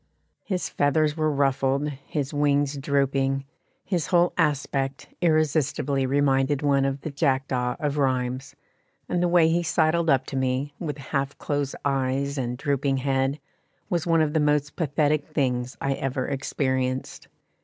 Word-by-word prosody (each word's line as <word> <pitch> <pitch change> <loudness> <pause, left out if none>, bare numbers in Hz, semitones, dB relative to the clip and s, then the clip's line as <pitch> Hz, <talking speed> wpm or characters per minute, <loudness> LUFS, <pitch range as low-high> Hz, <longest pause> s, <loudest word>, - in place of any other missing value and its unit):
His 185 -3 -2
feathers 150 +1 +1
were 155 -1 +1
ruffled, 140 0 +1
his 140 0 -4
wings 145 -1 +2
drooping, 135 -1 0 0.4
his 175 -7 -1
whole 175 -1 +3
aspect 140 -4 -1
irresistibly 150 -4 +1
reminded 135 0 +2
one 140 -1 +3
of 135 0 -2
the 155 - -5
Jackdaw 130 -4 0
of 150 -1 -1
Rheims; 130 +1 -1 0.5
and 175 - 0
the 175 - +3
way 170 -2 +5
he 170 +2 +2
sidled 165 0 +2
up 130 -2 +3
to - - -6
me, 130 +2 -1
with 150 -4 -4
half 140 0 -3
closed 145 -2 -2
eyes 135 +1 0
and 125 -1 -2
drooping 140 0 0
head, 135 +1 0 0.5
was 175 -1 0
one 165 -1 +4
of 150 -1 +1
the 160 - +2
most 150 -1 +1
pathetic 150 -1 +1
things 125 -3 -1
I 135 - 0
ever 130 -1 -2
experienced. 130 -1 -2
140 Hz, 145 wpm, -25 LUFS, 135-150 Hz, 0.5 s, way